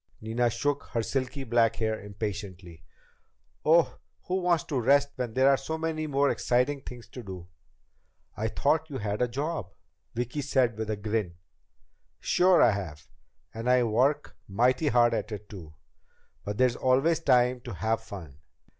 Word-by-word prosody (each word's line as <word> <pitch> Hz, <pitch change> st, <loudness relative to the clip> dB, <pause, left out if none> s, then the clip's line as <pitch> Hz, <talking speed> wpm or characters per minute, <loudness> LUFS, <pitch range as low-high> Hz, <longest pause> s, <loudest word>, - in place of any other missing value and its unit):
Nina 115 Hz, +2 st, 0 dB
shook 145 Hz, +5 st, -1 dB
her 115 Hz, -2 st, 0 dB
silky 135 Hz, +2 st, -3 dB
black 115 Hz, -2 st, +2 dB
hair 110 Hz, -1 st, -1 dB
impatiently. 100 Hz, -5 st, -7 dB, 0.8 s
"Oh, 160 Hz, -2 st, +3 dB, 0.2 s
who 185 Hz, +1 st, -1 dB
wants 175 Hz, -2 st, +2 dB
to 145 Hz, -7 st, -2 dB
rest 140 Hz, +4 st, +4 dB
when 120 Hz, -3 st, -4 dB
there 130 Hz, +1 st, +4 dB
are 140 Hz, -1 st, +5 dB
so 160 Hz, +4 st, -4 dB
many 160 Hz, -1 st, -2 dB
more 140 Hz, -1 st, +2 dB
exciting 125 Hz, +3 st, 0 dB
things 125 Hz, -3 st, -10 dB
to 125 Hz, -, -8 dB
do?" 95 Hz, -5 st, -9 dB, 0.9 s
"I 110 Hz, +2 st, -2 dB
thought 155 Hz, +7 st, 0 dB
you 140 Hz, -, -4 dB
had 105 Hz, -2 st, -3 dB
a 125 Hz, -, +3 dB
job," 135 Hz, -, -4 dB, 0.4 s
Vicki 120 Hz, +5 st, -2 dB
said 130 Hz, -5 st, +1 dB
with 110 Hz, 0 st, -4 dB
a 110 Hz, -, 0 dB
grin. 105 Hz, -3 st, -2 dB, 0.8 s
"Sure 180 Hz, 0 st, +4 dB
I 120 Hz, -, +6 dB
have. 80 Hz, -7 st, -6 dB, 0.5 s
And 115 Hz, +2 st, -3 dB
I 125 Hz, -1 st, +5 dB
work 130 Hz, +6 st, +1 dB
mighty 125 Hz, +8 st, +2 dB
hard 120 Hz, -3 st, +4 dB
at 115 Hz, -, -2 dB
it 105 Hz, -1 st, -7 dB
too. 80 Hz, -6 st, -11 dB, 0.7 s
But 105 Hz, 0 st, -4 dB
there's 125 Hz, -1 st, +3 dB
always 135 Hz, +6 st, +2 dB
time 125 Hz, -4 st, +3 dB
to 120 Hz, -6 st, -6 dB
have 110 Hz, +6 st, -1 dB
fun." 85 Hz, -10 st, -10 dB
120 Hz, 165 wpm, -28 LUFS, 105-140 Hz, 0.9 s, I